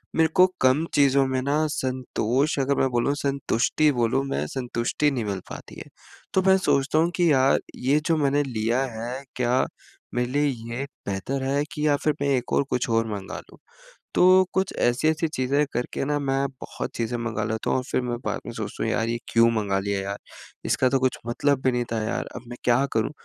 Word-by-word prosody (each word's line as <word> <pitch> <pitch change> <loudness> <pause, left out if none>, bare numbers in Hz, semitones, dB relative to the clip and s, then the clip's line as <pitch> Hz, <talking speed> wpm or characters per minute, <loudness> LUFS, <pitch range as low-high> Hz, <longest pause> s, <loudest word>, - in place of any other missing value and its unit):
मेरे 160 0 +4
को 185 - +8 0.2
कम 130 +5 +4
चीज़ों 140 -1 +4
में 130 0 -1
ना, 145 +3 +1
संतोष 130 0 -1
अगर 140 +1 +1
मैं 135 - +3
बोलूँ, 120 +3 +1
संतुष्टि 140 +1 +1
बोलूँ 120 +2 +1
मैं, 75 - -2
संतुष्टि 125 - -1
नहीं 125 -5 -2
मिल 100 -2 -2
पाती - - -9
है। - - -8 0.5
तो 190 - +5
मैं 190 0 +6
सोचता 145 -3 +2
हूँ 165 +2 +3
कि, 175 -3 +3
"यार, 135 0 +4 0.2
ये 135 +4 +2
जो 165 - +3
मैंने 145 -1 +2
लिया 120 -1 0 0.2
है, 125 +4 -5
क्या 125 +1 +2 0.5
मेरे 120 0 +1
लिए 145 +2 +2 0.2
ये 120 +4 -3 0.2
बेहतर 115 +8 -2
है 140 +2 +1
कि 150 -1 -1
या 145 - +4
फिर 155 - +3
मैं 140 - +1
एक 125 - -5
और - - +3
कुछ 125 +1 -1
और 115 0 +2
मँगा 100 -2 -6
लूँ?" - - -16 0.6
तो 185 +1 +6
कुछ 190 0 0
ऐसी-ऐसी 155 +7 +2
चीज़ें 140 0 +1
करके 125 +3 -2
ना, 145 +1 0
मैं 135 0 0
बहुत - - -5
चीज़ें 120 +1 -1
मँगा 115 -2 -2
लेता 110 0 -2
हूँ - - +2
और 130 - -2
फिर - - +1
मैं 120 -1 -3
बाद - - -1
में 120 - -5
सोचता 110 -3 -5
हूँ, 110 - 0
"यार, 110 +1 0
ये 115 0 -1
क्यों 115 0 +6
मँगा 100 -2 0
लिया 100 0 -2
यार? 100 +1 -4 0.5
इसका 130 - +2
तो 135 +1 +2
कुछ 130 0 +1
मतलब 135 +3 +1
भी 130 - +3
नहीं 120 -1 -1
था 110 - -1
यार। 110 - -2
अब - - -7
मैं 120 - -7
क्या 125 +3 +4
करूँ?" 110 +3 0
130 Hz, 210 wpm, -25 LUFS, 120-145 Hz, 0.6 s, को